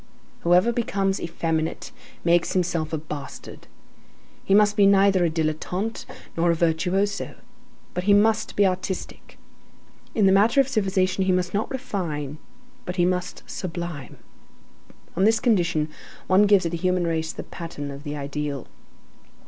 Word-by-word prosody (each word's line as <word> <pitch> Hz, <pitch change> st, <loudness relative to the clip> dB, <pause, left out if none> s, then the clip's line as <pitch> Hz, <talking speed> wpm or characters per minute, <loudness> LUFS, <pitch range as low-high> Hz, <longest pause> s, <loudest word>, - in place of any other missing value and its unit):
Whoever 180 Hz, +7 st, +3 dB
becomes 195 Hz, -4 st, -1 dB
effeminate 165 Hz, -1 st, -2 dB, 0.3 s
makes 170 Hz, 0 st, +3 dB
himself 170 Hz, -4 st, 0 dB
a 160 Hz, -, -1 dB
bastard. 150 Hz, -2 st, -8 dB, 0.8 s
He 195 Hz, -, +3 dB
must 210 Hz, 0 st, +4 dB
be 200 Hz, -2 st, +5 dB
neither 195 Hz, -2 st, +4 dB
a 170 Hz, -, +3 dB
dilettante 165 Hz, +7 st, -2 dB, 0.3 s
nor 170 Hz, +1 st, +2 dB
a 170 Hz, -, +3 dB
virtuoso: 180 Hz, +5 st, 0 dB, 0.6 s
but 180 Hz, +1 st, -3 dB
he 205 Hz, -, +5 dB
must 220 Hz, +1 st, +2 dB
be 205 Hz, -, +4 dB
artistic. 185 Hz, 0 st, -4 dB, 0.8 s
In 210 Hz, -, +3 dB
the 190 Hz, -, +6 dB
matter 215 Hz, +7 st, +4 dB
of 270 Hz, -, +4 dB
civilization, 190 Hz, -5 st, +1 dB
he 190 Hz, -, +2 dB
must 180 Hz, 0 st, 0 dB
not 205 Hz, +2 st, -1 dB
refine, 170 Hz, -, -4 dB, 0.4 s
but 180 Hz, -, -5 dB
he 175 Hz, -2 st, +3 dB
must 180 Hz, 0 st, -2 dB
sublime. 170 Hz, -6 st, -6 dB, 1.0 s
On 185 Hz, -, +1 dB
this 225 Hz, +2 st, +4 dB
condition, 175 Hz, -9 st, +1 dB, 0.4 s
one 195 Hz, +3 st, +4 dB
gives 200 Hz, -2 st, +5 dB
to 165 Hz, -, -2 dB
the 170 Hz, -, -2 dB
human 180 Hz, 0 st, +1 dB
race 160 Hz, -1 st, -1 dB
the -, -, -7 dB
pattern 145 Hz, -4 st, -7 dB
of 140 Hz, +1 st, -9 dB
the 150 Hz, -1 st, -5 dB
ideal. 145 Hz, -1 st, -4 dB
180 Hz, 150 wpm, -24 LUFS, 165-200 Hz, 1.0 s, the